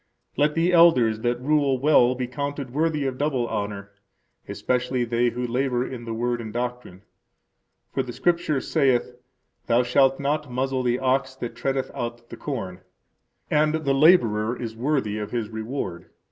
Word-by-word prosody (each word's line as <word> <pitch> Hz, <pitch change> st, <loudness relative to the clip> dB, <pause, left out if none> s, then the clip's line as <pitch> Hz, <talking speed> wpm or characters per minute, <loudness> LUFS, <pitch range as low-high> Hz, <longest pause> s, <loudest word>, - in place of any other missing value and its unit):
Let 150 Hz, +1 st, +2 dB
the 170 Hz, +2 st, +2 dB
elders 130 Hz, -11 st, +5 dB
that 120 Hz, +1 st, -1 dB
rule 140 Hz, 0 st, +2 dB
well 130 Hz, -3 st, +4 dB
be 125 Hz, 0 st, -2 dB
counted 140 Hz, 0 st, -5 dB
worthy 155 Hz, -1 st, 0 dB
of 130 Hz, -1 st, -3 dB
double 140 Hz, -5 st, 0 dB
honor, 100 Hz, -2 st, -4 dB, 0.6 s
especially 125 Hz, 0 st, -1 dB
they 120 Hz, +1 st, +1 dB
who 125 Hz, +1 st, -4 dB
labor 125 Hz, 0 st, 0 dB
in 120 Hz, -3 st, -7 dB
the 115 Hz, -, -4 dB
Word 120 Hz, +1 st, -1 dB
and 110 Hz, -2 st, -7 dB
doctrine. 120 Hz, -5 st, -5 dB, 0.9 s
For -, -, +1 dB
the -, -, -6 dB
Scripture 170 Hz, -5 st, 0 dB
saith, 130 Hz, -5 st, +1 dB, 0.5 s
Thou 120 Hz, +2 st, +3 dB
shalt 135 Hz, +2 st, +3 dB
not 145 Hz, +1 st, -1 dB
muzzle 130 Hz, +1 st, -1 dB
the 120 Hz, -1 st, +1 dB
ox 130 Hz, 0 st, 0 dB
that 120 Hz, -3 st, -6 dB
treadeth 135 Hz, -1 st, -2 dB
out 120 Hz, 0 st, -6 dB
the -, -, -6 dB
corn; 95 Hz, -10 st, -5 dB, 0.7 s
and 150 Hz, +1 st, +3 dB
the 150 Hz, -3 st, 0 dB
laborer 120 Hz, -7 st, +4 dB
is 115 Hz, -2 st, -5 dB
worthy 120 Hz, -4 st, -1 dB
of 105 Hz, -, -5 dB
his 115 Hz, -3 st, -3 dB
reward. 110 Hz, -6 st, -5 dB
125 Hz, 160 wpm, -24 LUFS, 120-140 Hz, 0.9 s, elders